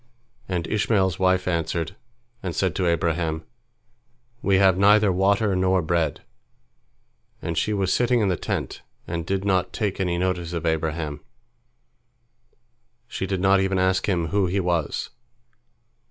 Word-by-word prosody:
And 90 -3 -1
Ishmael's 105 -4 +1
wife 95 0 +2
answered, 85 0 -1 0.5
and 90 -4 -4
said 95 -4 0
to 90 -2 0
Abraham, 80 -1 0 1.0
"We 100 - +2
have 95 -1 +5
neither 105 +1 +5
water 100 +2 +2
nor 95 -1 +2
bread," 80 -2 0 1.2
and 85 +1 -4
she 95 +7 0
was 95 -3 +1
sitting 120 0 +2
in 105 - +2
the 90 - +1
tent, - - -4 0.2
and 85 0 -4
did 95 0 -1
not 95 -2 +1
take 105 -3 -2
any 90 -2 0
notice 90 -2 -1
of 85 0 -3
Abraham. 80 -2 -2 1.9
She 95 -5 -4
did 95 -1 -2
not 95 0 +4
even 95 0 0
ask 95 +2 +1
him 85 -4 0
who 100 0 +1
he 95 +3 0
was. 85 -4 -1
95 Hz, 140 wpm, -24 LUFS, 85-95 Hz, 1.9 s, have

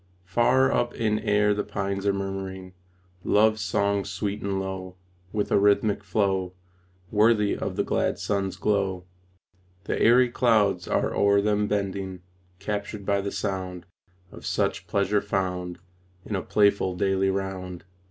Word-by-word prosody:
Far 125 +7 +3
up 120 0 0
in 110 -2 0
air 105 0 +2
the 105 - -1
pines 100 0 -3
are - - +5
murmuring 95 -1 -5 0.5
Love 110 +1 +3
songs 100 0 0
sweet 100 -1 -3
and 100 -1 -1
low, 95 -1 -5 0.4
With 105 -1 -2
a - - +5
rhythmic 100 0 +2
flow, 95 -2 0 0.6
Worthy 105 -1 +3
of - - -4
the - - +1
glad - - 0
sun's 100 -2 -2
glow. 95 -3 -1 0.8
The - - -2
airy 120 +1 +5
clouds 105 -8 +2
are - - 0
o'er 100 0 +4
them 105 0 +1
bending, 95 -3 -3 0.3
Captured 100 +1 -4
by 100 0 +1
the 100 0 -4
sound 95 -2 -4 0.5
Of - - -12
such - - -1
pleasure 100 +1 +1
found 90 -3 -2 0.5
In 105 - -3
a 95 - -1
playful 100 -3 +2
daily 95 +1 +1
round. 95 -2 -4
100 Hz, 145 wpm, -26 LUFS, 95-105 Hz, 0.8 s, are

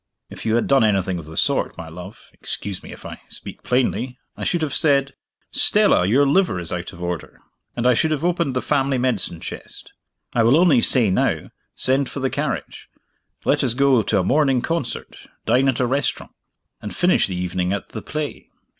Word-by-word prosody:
"If - - -7
you 110 - +2
had 120 - +1
done 135 -3 +4
anything 95 -4 +1
of 80 - -10
the 80 - -6
sort, - - +1
my 85 - -7
love 90 +5 -11
(excuse 100 -2 -4
me, - - -11
if - - -12
I - - -8
speak - - -7
plainly), 125 0 0 0.2
I - - -7
should 170 -2 0
have 150 - -2
said, 140 -2 +2 0.4
'Stella, 90 - +4
your 135 +8 +4
liver 145 - +2
is 85 -2 -5
out 90 -1 -4
of 85 - -10
order'; 85 -2 -5 0.4
and 120 - -2
I 125 - +6
should 160 +7 +1
have 155 +1 -1
opened 170 -6 0
the 130 - -1
family 135 -1 +1
medicine 120 -9 -1
chest. - - -9 0.4
I 120 - +2
will 120 +6 +5
only 165 -8 +5
say 115 -6 +4
now - - 0 0.2
send 135 +1 +1
for - - -6
the 130 -1 -1
carriage; - - -4 0.6
let - - +2
us 120 - +3
go 135 -3 +4
to 105 0 0
a - - +1
morning 135 +2 +2
concert, 165 -7 -3 0.3
dine 125 +4 +3
at 125 - -1
a 130 - +2
restaurant, 135 +3 -1 0.5
and 105 - -7
finish 180 +1 +3
the 95 - -4
evening 90 0 -2
at 100 - -3
the 110 - -7
play." 150 -1 -5
125 Hz, 200 wpm, -21 LUFS, 95-140 Hz, 0.6 s, I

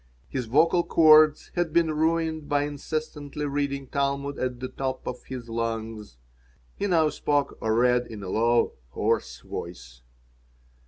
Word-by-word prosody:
His 130 -3 -3
vocal 165 +8 +3
cords 155 -2 +5
had 175 -2 -1
been 165 -2 +3
ruined 160 -1 0
by 145 0 +2
incessantly 150 0 -4
reading 140 -1 -2
Talmud 140 +1 -2
at 125 -1 -2
the 130 - -4
top 130 0 -4
of 125 - -6
his 125 -2 -7
lungs. 115 - -4 0.6
He 205 - -2
now 165 -5 +3
spoke 145 -1 0
or 110 0 +1
read 125 +1 +3
in 105 -3 -8
a 95 - -5
low, 115 +3 +2 0.2
hoarse 85 - -1
voice. - - -8
140 Hz, 145 wpm, -26 LUFS, 115-155 Hz, 0.6 s, cords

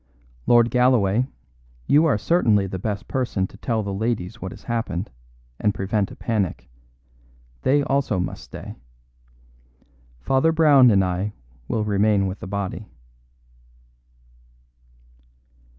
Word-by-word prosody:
Lord 120 -1 +5
Galloway, 125 -2 +3 0.6
you 150 - +4
are 140 - +2
certainly 110 - +2
the 95 -1 -5
best 100 0 -4
person 120 -7 -1
to - - -12
tell 115 -3 -2
the 100 -1 -4
ladies 110 0 -3
what 95 - -5
has - - -12
happened, 115 -5 -3 0.5
and 105 -1 +1
prevent 100 +1 -1
a - - -11
panic. 105 -6 -2 0.9
They 145 - +2
also 135 -8 0
must 90 - -4
stay. - - -9 1.4
Father 135 - +2
Brown 150 -6 +6
and 100 -3 +4
I 90 +3 -2 0.3
will 110 - -1
remain 105 -1 +2
with 95 +1 -4
the - - -8
body." 100 0 -4
105 Hz, 120 wpm, -23 LUFS, 95-125 Hz, 1.4 s, Brown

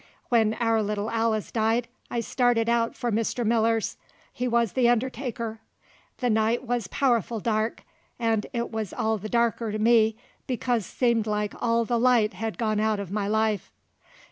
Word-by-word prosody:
When 225 -3 +3
our 225 -2 +1
little 210 +1 -2
Alice 225 -2 0
died 225 +1 +1 0.2
I 235 - -1
started 240 -2 +1
out 235 -1 +1
for 240 - -2
Mr. 230 +2 -1
Miller's; 225 0 +1 0.4
he 250 - -2
wuz 235 -3 +1
the 250 -2 +3
undertaker. 235 -2 -2 0.6
The 250 - 0
night 220 +3 +1
wuz 240 -4 -1
powerful 235 -4 +1
dark, 220 +1 -1 0.4
'nd 225 -2 0
it 235 -2 -3
wuz 220 -1 -2
all 220 0 0
the 215 - -6
darker 235 -1 +1
to 215 - -2
me, 220 0 +4 0.3
because 245 -4 -1
seemed 235 -3 +1
like 210 -1 -1
all 230 0 +2
the 235 0 0
light 235 -3 +3
hed 225 -1 -4
gone 215 -2 0
out 215 -1 +1
in 200 -1 -6
my 205 -1 -1
life. 215 -2 0
225 Hz, 170 wpm, -26 LUFS, 215-235 Hz, 0.6 s, me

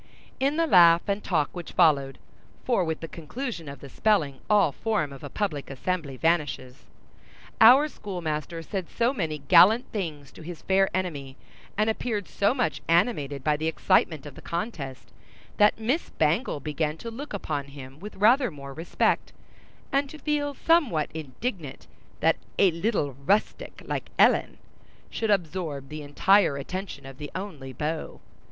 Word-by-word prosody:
In 280 +3 +1
the 330 - +3
laugh 170 - +6
and 200 +1 -1
talk 155 -4 0
which 175 -1 -7
followed 140 -4 +3 0.5
(for 235 -7 +1
with 160 -2 -3
the 165 - -5
conclusion 170 - -6
of 140 - -10
the 140 - -9
spelling, 150 - +1
all 205 -7 +4
form 205 -7 -2
of 135 - -12
a 145 - -6
public 155 -6 -3
assembly 140 0 -3
vanishes), 145 -5 -1 0.7
our 255 +7 +8
schoolmaster 165 - -5
said 185 +1 -5
so 240 +2 +1
many 160 - -2
gallant 185 - +6
things 155 - -5
to - - -13
his 170 +1 -9
fair 195 0 +3
enemy, 145 -7 -4 0.4
and 215 +1 +2
appeared 220 -2 -2
so 205 +5 +1
much 245 - -1
animated 165 - +1
by 150 +1 +2
the 155 +2 -2
excitement 160 -2 +1
of 145 - -9
the - - -13
contest, 170 - -5 0.5
that 210 0 +5
Miss 255 +9 -1
Bangle 160 - 0
began 150 +2 -2
to 230 +7 -7
look 275 +5 -8
upon 145 -8 -3
him 140 0 -11
with 210 +3 -9
rather 240 +5 +4
more 140 -3 -9
respect, 165 +4 0 0.6
and 275 0 +1
to 310 - -10
feel 295 -2 -1
somewhat 270 - +2
indignant 160 - -5 0.4
that - - +3 0.2
a 195 -3 +5
little 165 - -1
rustic 205 +2 0
like - - -4
Ellen - - +4 0.5
should 225 - -2
absorb 165 -7 -1
the 155 0 -6
entire 150 +2 +3
attention 185 +4 -6
of 135 0 -11
the 145 -1 -6
only 170 -9 -6
beau. 155 +5 -4
170 Hz, 160 wpm, -26 LUFS, 145-210 Hz, 0.7 s, our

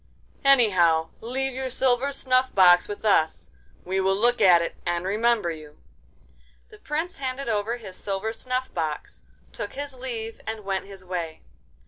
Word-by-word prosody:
'Anyhow, 185 -12 +4
leave 265 +3 -3
your 260 0 -3
silver 260 +2 +1
snuff 260 -1 +1
box 180 -2 +6
with 205 +1 -7
us. 160 -7 +2 0.3
We 190 +2 -1
will 190 0 +2
look 240 +4 +2
at 175 -2 +7
it 170 - -3
and 175 0 -1
remember 215 -2 +1
you.' 155 -2 -10 0.9
The - - -15
Prince 315 +4 -3
handed 265 0 -4
over 220 +1 -1
his 190 -6 -11
silver 200 +3 -3
snuff 255 +2 -3
box, 155 -3 -4 0.3
took - - -6
his 285 0 -5
leave, 235 -3 -6
and 220 -1 -4
went 195 -1 -2
his 195 -2 -10
way. 170 -3 -5
220 Hz, 155 wpm, -25 LUFS, 180-255 Hz, 0.9 s, at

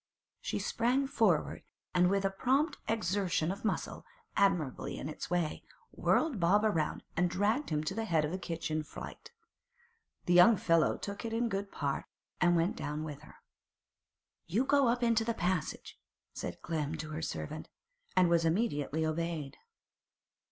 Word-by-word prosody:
She - - -2
sprang 250 +4 +1
forward, 215 - +1 0.3
and 180 0 +4
with 195 0 +1
a 195 - +2
prompt 265 - +1
exertion 185 -5 0
of 200 - -7
muscle, 220 - -2 0.3
admirable 175 -10 +2
in - - -5
its 155 - -6
way, 175 -3 0 0.3
whirled 310 -9 +1
Bob 190 +5 +4
round 165 -8 0
and 180 +1 +2
dragged 205 - +1
him 150 -1 0
to 155 - -2
the 225 0 -2
head 160 -6 +2
of 150 - -3
the 185 - -3
kitchen 165 -3 -2
flight. 310 - -9 1.0
The 175 - +2
young 180 +5 +8
fellow 165 -3 +3
took 200 +2 -6
it 225 -1 -3
in 235 +1 +1
good 200 -1 -3
part, 140 -2 -2 0.3
and 175 -1 +4
went 170 +3 +2
down 150 +1 -4
with 150 -3 -6
her. - - -15 1.1
'You 215 +10 +1
go 280 -1 +4
up 240 +1 +1
into 230 -1 +3
the 230 0 -1
passage,' 180 -4 -2 0.3
said - - -6
Clem 155 -2 -2
to 155 0 -6
her 155 +1 -4
servant, 155 0 -5 0.5
and 180 -1 +5
was 170 -1 +3
immediately 160 - 0
obeyed. 155 -2 -2
180 Hz, 160 wpm, -32 LUFS, 160-220 Hz, 1.1 s, young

